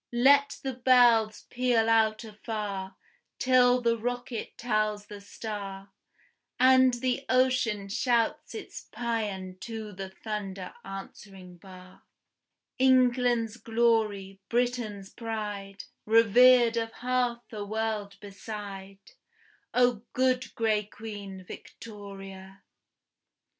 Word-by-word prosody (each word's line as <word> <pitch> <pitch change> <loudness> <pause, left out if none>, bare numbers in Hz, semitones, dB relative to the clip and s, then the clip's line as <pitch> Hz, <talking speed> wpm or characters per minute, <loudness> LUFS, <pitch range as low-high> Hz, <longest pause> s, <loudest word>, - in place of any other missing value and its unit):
Let 280 +1 +5
the 265 -1 -2
bells 240 -3 +4
peal 245 -2 +2
out 220 -1 +3
afar, 210 -3 -5 0.4
till 250 -1 +4
the 235 -1 +2
rocket 245 0 -5
tells 215 -3 -1
the 205 -1 -10
star, 200 -2 -7 0.7
And 260 0 +6
the 255 +2 -1
ocean 255 -5 +2
shouts 235 - 0
its 435 - -9
pæan 205 -6 -3
to 220 -2 -7
the 190 0 -6
thunder 195 -2 -6
answering 195 -1 -10
bar; 185 0 -14 0.8
England's 250 -3 +3
glory, 220 -5 0
Britain's 235 -5 -1
pride, 210 -4 -5 0.2
Revered 235 +2 +6
of 225 0 -1
half 245 -1 -1
a 210 -2 -5
world 215 -1 -3
beside, 200 - -9 0.6
O 245 -3 +2
good 255 -1 0
gray 220 -2 +1
Queen, 200 -3 -9
Victoria! 195 -2 -11
220 Hz, 95 wpm, -28 LUFS, 200-245 Hz, 0.8 s, And